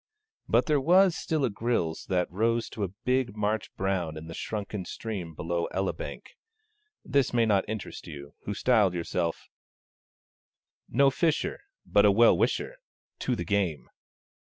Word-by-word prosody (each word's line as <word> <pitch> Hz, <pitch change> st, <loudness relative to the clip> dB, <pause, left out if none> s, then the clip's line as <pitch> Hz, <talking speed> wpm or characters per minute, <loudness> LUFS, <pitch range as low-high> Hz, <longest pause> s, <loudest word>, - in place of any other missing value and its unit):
But -, -, +4 dB
there 150 Hz, -3 st, +2 dB
was 180 Hz, +4 st, +5 dB
still 155 Hz, -4 st, 0 dB
a 120 Hz, -, -1 dB
grilse 100 Hz, -7 st, -1 dB
that 90 Hz, -2 st, +1 dB
rose 115 Hz, +4 st, 0 dB
to 105 Hz, -, -4 dB
a -, -, +1 dB, 0.2 s
big 125 Hz, -4 st, +1 dB
March 105 Hz, +1 st, -1 dB
brown 90 Hz, -5 st, -1 dB
in 80 Hz, -, -8 dB
the 80 Hz, -, -8 dB
shrunken 105 Hz, +1 st, -4 dB
stream 90 Hz, -4 st, -6 dB
below 85 Hz, +2 st, -2 dB
Elibank. 95 Hz, 0 st, -4 dB, 0.7 s
This 140 Hz, -3 st, +1 dB
may 115 Hz, -1 st, +4 dB
not 100 Hz, -2 st, +2 dB
interest 110 Hz, -4 st, -6 dB
you, 70 Hz, -2 st, -9 dB
who 100 Hz, -, -3 dB
styled 105 Hz, -6 st, +3 dB
yourself 85 Hz, 0 st, -2 dB, 1.4 s
No 135 Hz, +2 st, +4 dB
fisher, 160 Hz, +3 st, 0 dB, 0.3 s
But 105 Hz, 0 st, +4 dB
a 105 Hz, -, +7 dB
well 115 Hz, +4 st, +6 dB
wisher -, -, 0 dB, 0.4 s
To 125 Hz, -, 0 dB
the -, -, -4 dB
game! 90 Hz, -, -1 dB
105 Hz, 150 wpm, -28 LUFS, 90-120 Hz, 1.4 s, a